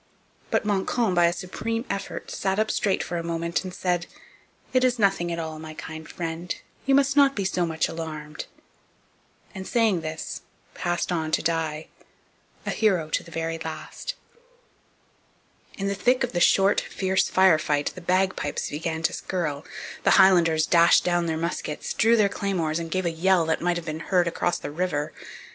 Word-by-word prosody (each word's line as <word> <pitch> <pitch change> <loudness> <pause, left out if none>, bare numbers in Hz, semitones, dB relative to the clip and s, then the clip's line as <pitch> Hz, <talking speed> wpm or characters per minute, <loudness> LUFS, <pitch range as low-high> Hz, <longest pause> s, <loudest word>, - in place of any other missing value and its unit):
But - - +1
Montcalm, 205 +1 +1
by 175 -1 +5
a - - +2
supreme 225 +7 -4
effort, 195 0 -5
sat 190 0 -1
up 215 0 +1
straight 200 -2 +1
for 175 - -4
a 170 - -3
moment 170 +1 -2
and 185 - -6
said: 175 -1 -1 0.7
'It 255 0 +4
is 250 -1 +3
nothing 195 -5 +2
at 170 - -2
all, 160 -1 -5
my 155 0 -8
kind 160 0 -8
friend; 170 +1 -4 0.3
you 270 - +5
must 275 0 +3
not 280 -1 +5
be 200 - -1
so 180 -2 0
much 160 -1 0
alarmed!' 155 -2 -6 1.1
and, 190 0 -7
saying 220 -7 +2
this, 155 0 -5 0.3
passed 175 +1 -2
on 160 -3 -1
to - - +2
die, 160 -2 -1 0.8
a - - -1
hero 180 -8 +1
to - - +1
the - - -14
very 165 0 -3
last. 160 - -6 1.6
In 195 - -2
the 200 - 0
thick 245 +6 +2
of 245 - -1
the 175 - -1
short, 195 +3 +4
fierce 190 0 0
fire 185 -4 +5
fight 145 -1 0
the 185 - -10
bagpipes 185 -3 0
began 160 +1 -3
to - - +1
skirl, 155 -6 -3 0.4
the - - +5
Highlanders 170 -5 +5
dashed 170 0 +5
down 175 -1 +1
their 160 -1 -1
muskets, 165 -2 -3
drew 230 +2 +4
their 215 -3 +4
claymores, 175 -6 -1
and 165 -1 -5
gave 185 +2 -1
a 170 - +1
yell 175 +1 +3
that 160 0 0
might 175 0 +1
have 170 - -6
been 155 -1 -4
heard 175 +1 +1
across 175 +1 0
the - - -6
river. 155 -2 -2
175 Hz, 180 wpm, -25 LUFS, 160-195 Hz, 1.6 s, by